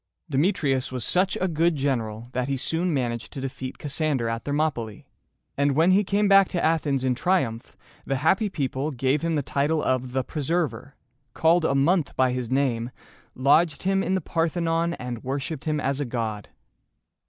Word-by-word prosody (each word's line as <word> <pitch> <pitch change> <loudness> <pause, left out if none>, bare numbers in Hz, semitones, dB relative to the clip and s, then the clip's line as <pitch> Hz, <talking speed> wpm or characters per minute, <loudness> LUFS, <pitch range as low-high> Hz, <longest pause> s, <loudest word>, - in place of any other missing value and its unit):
Demetrius 135 -4 +1
was 125 -2 -4
such 185 +1 +1
a 185 - +1
good 165 0 +1
general 120 -5 -2
that 125 0 -2
he 140 -1 -1
soon 165 +7 -1
managed 120 -5 -2
to - - -7
defeat 130 -1 -5
Cassander 145 -4 -1
at 115 0 -3
Thermopylæ; 145 -8 -2 0.5
and 140 0 +2
when 165 +6 +4
he 200 +3 +4
came 200 +1 +1
back 195 -1 +6
to 175 - -1
Athens 150 -4 +1
in 130 -1 +2
triumph, 125 -5 -1 0.3
the 135 - -1
happy 190 - +2
people 140 -4 -2
gave 135 +1 0
him 165 -1 0
the 145 - 0
title 145 +3 0
of 130 -1 -1
"The 130 0 0
Preserver," 145 -3 -2 0.4
called 165 +1 +3
a 140 - +2
month 155 +3 +2
by 130 -1 +3
his 125 -2 -3
name, 125 -3 0 0.5
lodged 145 +4 +3
him 195 +1 +2
in 190 +1 0
the 190 - 0
Parthenon, 165 +1 0
and 125 -3 -6
worshiped 135 +2 -4
him 155 -1 0
as 140 0 -1
a 145 - -1
god. 110 -4 -4
140 Hz, 175 wpm, -25 LUFS, 130-165 Hz, 0.5 s, back